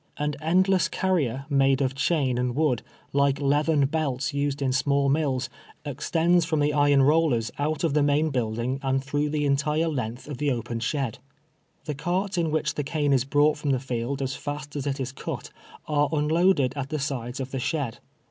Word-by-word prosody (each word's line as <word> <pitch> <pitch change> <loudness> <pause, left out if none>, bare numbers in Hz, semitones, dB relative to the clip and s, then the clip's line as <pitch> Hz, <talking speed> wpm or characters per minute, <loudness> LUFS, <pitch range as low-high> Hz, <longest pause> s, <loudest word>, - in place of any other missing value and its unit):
An 150 0 -1
end 180 +4 +3
less 190 -2 +3
carrier, 140 -9 -1
made 135 -2 +3
of 135 -2 0
chain 135 -3 +1
and 125 -1 -1
wood, 145 -6 +1 0.3
like 140 0 +2
leathern 145 +1 +2
belts 140 -3 -1
used 140 0 -1
in 135 -2 0
small 140 +1 +2
mills, 135 -3 0 0.4
extends 165 +5 +1
from 160 -1 0
the 145 0 +2
iron 145 -1 +4
rollers 145 -6 +2
out 155 +2 -1
of 160 -4 +1
the 150 - +3
main 145 +2 +2
buildino; 120 +1 -1
and 135 -1 0
throuo 145 +2 -1
h - - -4
the 150 -1 0
entire 150 +3 +1
length 125 -5 -4
of 145 -4 -6
the 150 - +1
open 120 -2 -2
shed. 130 -1 -2 0.7
The 150 - -2
carts 180 +7 -1
in 170 -2 +1
w^hich 155 0 0
the 145 - -2
cane 145 -1 0
is 130 -1 +2
brought 145 +2 +3
from 150 - -2
the 130 -2 +2
field 130 +2 -3
as 135 0 -2
fast 145 0 -6
as 145 -1 -3
it 140 0 -2
is 130 -1 -3
cut, 135 - -6 0.4
are 145 -1 +2
un 150 -2 +1
loaded 160 -5 +3
at 140 -1 -4
the 155 - -2
sides 135 -3 -3
of 130 0 -4
the 135 - -2
shed. 140 -3 -2
145 Hz, 205 wpm, -26 LUFS, 135-155 Hz, 0.7 s, iron